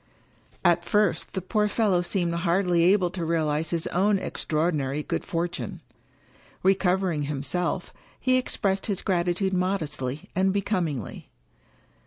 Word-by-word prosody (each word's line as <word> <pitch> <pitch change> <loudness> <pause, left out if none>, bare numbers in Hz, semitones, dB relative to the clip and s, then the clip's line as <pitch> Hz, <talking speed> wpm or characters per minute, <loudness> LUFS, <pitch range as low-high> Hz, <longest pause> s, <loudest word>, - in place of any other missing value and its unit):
At 175 0 +4
first 205 -3 +1
the 190 - -3
poor 210 +2 +1
fellow 205 -4 +2
seemed 175 -1 -1
hardly 170 0 +2
able 185 -1 +4
to 180 -2 -4
realize 160 -1 0
his 170 -1 -1
own 200 +3 +2
extraordinary 150 -5 -1
good - - -2
fortune. 170 +1 -3 0.8
Recovering 190 -3 +2
himself, 165 +5 -2 0.3
he 255 0 +3
expressed 195 -6 -1
his 200 -4 -2
gratitude 185 +1 0
modestly 155 -7 -2
and 190 +1 +3
becomingly. 180 - -2
175 Hz, 120 wpm, -26 LUFS, 165-195 Hz, 0.8 s, At